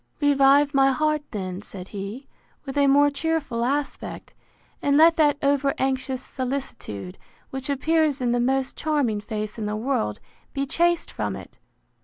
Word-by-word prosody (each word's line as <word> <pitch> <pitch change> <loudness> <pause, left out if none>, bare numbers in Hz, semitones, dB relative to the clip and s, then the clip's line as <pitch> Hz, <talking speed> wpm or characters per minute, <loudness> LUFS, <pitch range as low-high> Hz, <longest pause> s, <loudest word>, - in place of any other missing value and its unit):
Revive 285 0 +4
my 270 0 +5
heart 305 +2 +1
then, 185 -3 -5
said 190 -3 -9
he, 205 +7 -7 0.4
with 270 0 -6
a 285 -1 +4
more 285 +1 +5
cheerful 285 -6 -1
aspect; 280 +3 -3 0.5
and 285 0 +3
let 330 +2 +7
that 295 -2 +4
over 280 0 +2
anxious 265 -1 -1
solicitude, 250 - -5 0.3
which 265 +1 -4
appears 305 +1 +2
in 245 -2 0
the 245 - +1
most 265 +2 +1
charming 280 -9 0
face 215 0 -5
in 210 - -2
the 210 - -2
world, 215 - -1 0.3
be 275 0 -1
chased 345 +4 +1
from - - -3
it. - - -12
270 Hz, 155 wpm, -24 LUFS, 235-290 Hz, 0.5 s, let